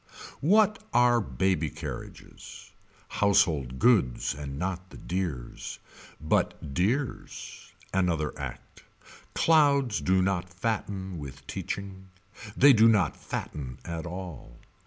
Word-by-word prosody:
What 210 +6 +3
are 120 -1 +5
baby 95 -6 0
carriages - - -9 0.4
Household 85 -11 +2
goods 95 - +3
And 70 -1 -6
not 90 +2 -3
the - - -12
dears. 85 -10 -4 0.4
But 75 -1 -1
dears. 120 - -2 0.2
Another 85 -5 +1
Act. - - -8 0.5
Clouds 140 -7 +4
do 95 0 +3
not 90 -2 -1
fatten 95 -5 -3
with 70 -1 -9
teaching. 95 +5 -5 0.5
They 140 +1 +8
do 115 -1 +6
not 105 -5 +3
fatten 65 -4 -6
at 85 0 -4
all. 85 -9 -8
95 Hz, 105 wpm, -28 LUFS, 80-110 Hz, 0.5 s, They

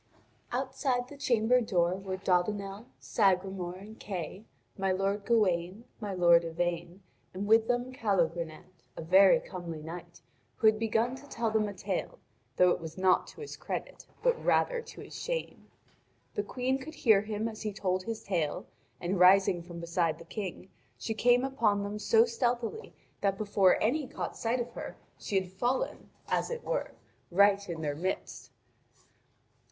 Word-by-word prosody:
Outside 260 -1 -1
the 290 - -10
chamber 250 -2 +3
door 175 -6 +1
were 190 0 -4
Dodinel, 195 +3 -1
Sagremor, 190 -3 +1
and 210 +4 -12
Kay, 190 +1 -6 0.3
my 195 -1 0
lord 195 +2 -1
Gawain, 195 -3 +1 0.2
my 210 -3 -4
lord 170 -2 +5
Yvain, 175 +2 -3 0.3
and 195 +2 -3
with 225 +1 +5
them 245 +1 -1
Calogrenant, 175 - -1 0.2
a - - -5
very 190 +3 +6
comely 170 -4 -7
knight, 170 +2 -9 0.4
who - - -2
had 215 0 +5
begun 225 +3 +1
to 285 +1 -14
tell 230 -1 -1
them 215 -1 +2
a - - -6
tale, 190 -1 -3 0.4
though 180 +3 +5
it - - 0
was 160 0 -8
not 185 0 +3
to - - -12
his 435 - -7
credit, - - -6 0.2
but - - +2
rather - - +2
to - - -11
his - - -11
shame. - - -4 0.7
The - - 0
Queen 255 +5 -1
could 310 +4 -9
hear 220 -5 +5
him 215 +1 -3
as 220 -1 -7
he 215 - -2
told 185 -2 -1
his 225 +2 -5
tale, 170 -7 -1 0.3
and 180 +2 -1
rising 185 -1 +6
from 170 0 -9
beside 170 -1 0
the 170 - -12
King, 190 0 -6 0.3
she 225 - -3
came 245 +3 +4
upon 225 -7 +1
them 205 +1 -4
so 225 +2 +5
stealthily 240 - -2 0.3
that 195 -1 +1
before 200 -3 +3
any 275 +5 +1
caught - - -5
sight 235 +2 -1
of 240 0 -3
her, - - -7 0.2
she 195 - 0
had 185 -1 -8
fallen, 245 +7 -2 0.2
as - - 0
it 485 0 -5
were, - - -2 0.4
right 200 +2 +4
in 165 -2 -4
their 145 -1 -1
midst. 185 +5 -4
200 Hz, 165 wpm, -30 LUFS, 180-230 Hz, 0.7 s, very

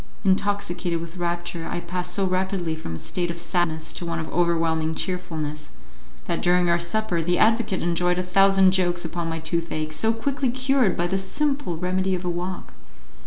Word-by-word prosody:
Intoxicated 190 -3 +1
with 170 +2 -8
rapture, 175 -1 -3
I - - -2
passed 180 0 -2
so 195 - +2
rapidly 185 -3 -1
from 120 - -6
a - - -5
state 175 - -2
of 170 0 -4
sadness 165 -2 -1
to - - -6
one 170 -1 -2
of 160 -1 -3
overwhelming 165 -2 +1
cheerfulness 155 -5 -3 0.6
that 170 - -2
during 175 0 +3
our 170 - +3
supper 175 0 0
the 175 +2 +1
advocate 225 -3 +2
enjoyed 175 +1 +1
a 180 - 0
thousand 195 +1 +5
jokes 175 -2 +1
upon 170 0 -3
my 165 - -2
toothache, 160 -1 -2
so 220 +9 +2
quickly 260 +3 -1
cured 260 -4 +2
by 175 - +1
the 190 +2 0
simple 275 - -1
remedy 185 +2 0
of 180 0 -5
a - - 0
walk. 175 +1 -4
175 Hz, 180 wpm, -24 LUFS, 170-190 Hz, 0.6 s, thousand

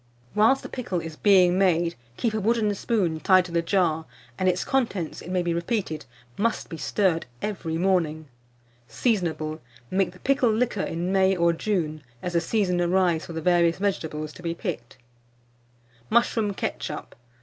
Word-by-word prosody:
Whilst 225 +6 +4
the - - -5
pickle 220 -8 -3
is 165 -1 -7
being 185 -1 +5
made, 170 -3 +3 0.2
keep 230 -2 0
a 215 - 0
wooden 215 0 +2
spoon 190 -6 0
tied 185 +1 +5
to 175 - -9
the 170 0 +2
jar; 165 -3 +1 0.3
and 185 - +3
its 180 0 0
contents, 225 -11 -1
it - - -9
may 180 -1 0
be 170 -1 0
repeated, 170 -2 -2 0.3
must 230 +2 0
be 165 - -6
stirred 165 +1 0
every 165 -4 -3
morning. 165 -4 +1 0.6
Seasonable. 165 -9 -1 0.3
Make 190 -1 +1
the 180 - -16
pickle 265 -2 +2
liquor 220 -2 0
in 175 +2 -2
May 190 0 +4
or 170 -1 +3
June, 165 -5 -1 0.2
as 180 - -3
the 170 - +3
season 180 -1 +1
arrives 175 -2 +2
for 170 - -7
the 160 - -4
various 170 0 +3
vegetables 160 -6 -2
to - - -12
be 170 -1 -3
picked. 135 - -5 1.1
MUSHROOM 225 -3 +2
KETCHUP. - - -4
472. - - -27
180 Hz, 170 wpm, -25 LUFS, 165-205 Hz, 1.1 s, being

